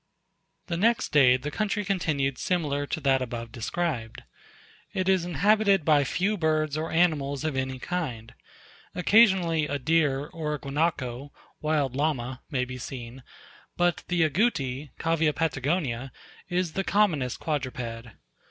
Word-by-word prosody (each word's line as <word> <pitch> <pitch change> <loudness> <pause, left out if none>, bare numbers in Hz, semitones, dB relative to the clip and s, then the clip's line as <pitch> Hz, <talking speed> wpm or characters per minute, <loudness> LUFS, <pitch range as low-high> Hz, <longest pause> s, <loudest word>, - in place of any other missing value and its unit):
The 170 - -3
next 230 +6 +2
day 130 -4 +5
the 145 +4 -5
country 210 +3 -1
continued 150 -9 0
similar 145 -5 -1
to 160 - -3
that 135 -1 +3
above 115 -2 -5
described. 120 -1 -3 0.7
It 185 -1 0
is 190 -2 +3
inhabited 200 +2 +3
by 150 -3 +4
few 195 +10 0
birds 155 -3 +1
or 155 +1 -2
animals 150 -5 +1
of 155 -3 -1
any 130 0 -2
kind. 125 -8 -4 0.6
Occasionally 180 -5 +4
a 145 - -1
deer, 145 -1 +1
or 150 -1 -4
a - - -4
Guanaco 140 -2 -2 0.3
(wild 150 -4 0
Llama) 130 -4 -1
may 130 -4 0
be 125 0 -7
seen; 125 0 -7 0.6
but 175 -1 +1
the 175 -2 +2
Agouti 150 - 0
(Cavia 165 -2 +1
Patagonica) 140 -4 -1 0.4
is 175 -2 -1
the 195 - -1
commonest 170 - +1
quadruped. 125 -6 -4
150 Hz, 135 wpm, -27 LUFS, 130-175 Hz, 0.7 s, day